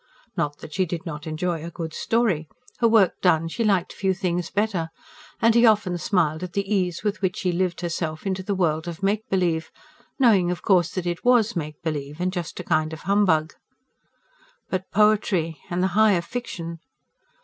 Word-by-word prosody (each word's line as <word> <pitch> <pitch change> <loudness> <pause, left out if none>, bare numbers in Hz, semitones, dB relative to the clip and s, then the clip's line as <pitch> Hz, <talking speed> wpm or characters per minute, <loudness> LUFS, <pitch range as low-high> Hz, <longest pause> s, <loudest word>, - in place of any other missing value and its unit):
Not 145 0 -1
that 155 - -9
she 185 -1 +1
did 170 +1 -5
not 150 -2 -6
enjoy 165 +1 -2
a 170 - -5
good 165 -2 -6
story: 210 -10 0 0.3
her 235 - +4
work 220 -5 +3
done, 165 -3 +3
she 230 +8 -2
liked 195 -5 +1
few 190 -1 0
things 175 -2 -2
better; 200 -6 -1 0.5
and 230 0 +4
he 235 +1 +5
often 210 -5 +4
smiled 160 -3 +1
at 180 -1 -6
the 200 -1 -1
ease 180 -3 0
with 205 -2 -1
which 185 -2 0
she 185 - 0
lived 175 0 -1
herself 165 -2 -3
into 190 -1 -1
the 200 +1 -2
world 160 -3 0
of 170 +2 -7
make 210 +2 0
believe, 170 -4 0 0.5
knowing, 210 -9 +4
of 180 - -3
course, 180 -4 +3
that 185 -2 -2
it 175 0 -3
WAS 240 -3 +4
make 155 -3 -4
believe 150 -1 -4
and 180 +1 -1
just 175 -4 -5
a - - -4
kind 155 -1 0
of 160 - -8
humbug. 180 -5 +2 1.2
But 185 0 -2
poetry, 195 -7 +2
and 180 +1 0
the 190 - +2
higher 210 -4 +4
fiction! 170 -7 -6
180 Hz, 190 wpm, -24 LUFS, 165-200 Hz, 1.2 s, he